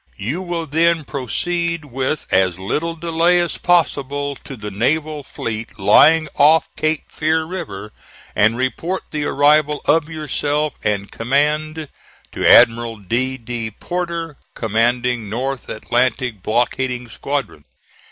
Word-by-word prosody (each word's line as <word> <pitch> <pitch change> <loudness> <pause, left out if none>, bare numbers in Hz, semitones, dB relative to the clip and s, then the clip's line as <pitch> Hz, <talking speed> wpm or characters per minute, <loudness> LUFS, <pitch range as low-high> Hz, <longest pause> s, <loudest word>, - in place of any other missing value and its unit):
You 130 - -3
will 175 -2 -3
then 165 +1 +2
proceed 170 +5 -2
with 135 +2 -2
as 95 -2 +2
little 155 - -2
delay 170 +2 +2
as 175 -1 -2
possible 145 -4 +1
to 135 - -9
the 105 -3 -7
naval 150 +8 0
fleet 115 -4 -6
lying 155 +11 +5
off 155 +3 +4
Cape 155 -1 -1
Fear 160 +1 0
River, 155 - -6 0.4
and 110 +3 +3
report 130 +9 -2
the 150 -1 -2
arrival 150 +1 +3
of 160 -1 +2
yourself 150 -1 -1
and 100 -2 -1
command 150 +5 0 0.4
to - - +1
Admiral 115 0 +5
D. 120 +7 -1
D. 115 -2 -5
Porter, 170 - -4 0.2
commanding 120 0 0
North 130 +4 -3
Atlantic 120 -1 -1
Blockading 125 +3 -1
Squadron. 135 - -4
140 Hz, 125 wpm, -19 LUFS, 115-160 Hz, 0.4 s, lying